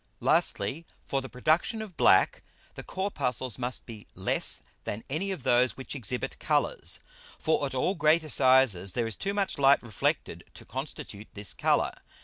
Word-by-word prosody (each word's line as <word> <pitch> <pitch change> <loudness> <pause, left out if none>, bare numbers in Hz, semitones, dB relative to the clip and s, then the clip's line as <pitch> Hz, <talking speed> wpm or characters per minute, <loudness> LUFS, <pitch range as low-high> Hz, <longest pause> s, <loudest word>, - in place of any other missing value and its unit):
Lastly, 135 +12 +1 0.2
for 135 - -1
the 130 - -8
production 155 - +1
of 215 -5 -7
black, - - +4 0.3
the - - -8
Corpuscles 130 - -2
must 125 0 -3
be 110 -3 -11
less - - +1 0.2
than 105 +2 -5
any 190 +7 -1
of 185 -9 -4
those 125 +1 +3
which 130 - -6
exhibit 125 -2 -4
Colours. - - 0 0.4
For 155 -2 +1
at 135 - -7
all 155 +9 +1
greater 155 -2 +3
sizes 130 -10 +4
there 120 - 0
is 115 -2 -3
too 200 +1 -2
much 200 -7 -1
Light 140 -1 +5
reflected 115 -4 -2
to - - -10
constitute 105 +2 -6
this 105 -1 -6
Colour. - - +2
130 Hz, 160 wpm, -28 LUFS, 120-160 Hz, 0.4 s, Light